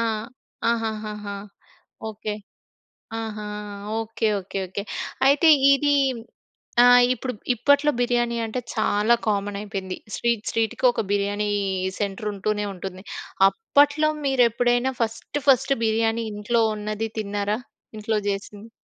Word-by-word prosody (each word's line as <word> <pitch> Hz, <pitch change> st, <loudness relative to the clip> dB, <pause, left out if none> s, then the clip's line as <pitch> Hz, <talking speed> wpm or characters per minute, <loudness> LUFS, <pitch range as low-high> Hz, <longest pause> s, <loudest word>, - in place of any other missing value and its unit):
ఆ! -, -, +1 dB, 0.7 s
ఆహాహాహా! 215 Hz, -3 st, -3 dB, 0.7 s
ఓకె. 215 Hz, 0 st, -5 dB, 0.9 s
ఆహా! 215 Hz, -1 st, -5 dB, 0.5 s
Okay 225 Hz, 0 st, -1 dB
okay 195 Hz, +1 st, -6 dB
okay. 190 Hz, +2 st, -5 dB, 0.4 s
అయితే 285 Hz, +4 st, +5 dB, 0.3 s
ఇది 290 Hz, +1 st, +2 dB, 0.9 s
ఆహ్, 245 Hz, 0 st, +8 dB
ఇప్పుడు 255 Hz, +1 st, -4 dB, 0.2 s
ఇప్పట్లో 285 Hz, +5 st, +3 dB
బిర్యానీ 240 Hz, -1 st, +1 dB
అంటే 225 Hz, +3 st, -3 dB, 0.2 s
చాలా 210 Hz, +3 st, +3 dB
కామన్ 205 Hz, -1 st, 0 dB
అయిపోయింది. 195 Hz, -3 st, -5 dB, 0.2 s
స్ట్రీట్ 235 Hz, -2 st, 0 dB
స్ట్రీట్‌కి 225 Hz, +3 st, -1 dB
ఒక -, -, -1 dB
బిర్యానీ 205 Hz, +1 st, 0 dB, 0.5 s
సెంటరుంటూనే 205 Hz, +1 st, -2 dB
ఉంటుంది. 190 Hz, 0 st, -7 dB, 0.5 s
అప్పట్లో 290 Hz, +2 st, +3 dB, 0.2 s
మీరెప్పుడైనా 245 Hz, -1 st, +2 dB
ఫస్ట్ 230 Hz, +5 st, -2 dB
ఫస్ట్ 270 Hz, 0 st, +5 dB
బిర్యానీ 225 Hz, +1 st, +1 dB
ఇంట్లో 210 Hz, +3 st, 0 dB, 0.2 s
ఉన్నది 215 Hz, +1 st, -3 dB
తిన్నారా? 205 Hz, 0 st, -1 dB, 0.4 s
ఇంట్లో 215 Hz, 0 st, 0 dB
చేసింది. 200 Hz, +2 st, -5 dB
220 Hz, 105 wpm, -24 LUFS, 205-240 Hz, 0.9 s, ఆహ్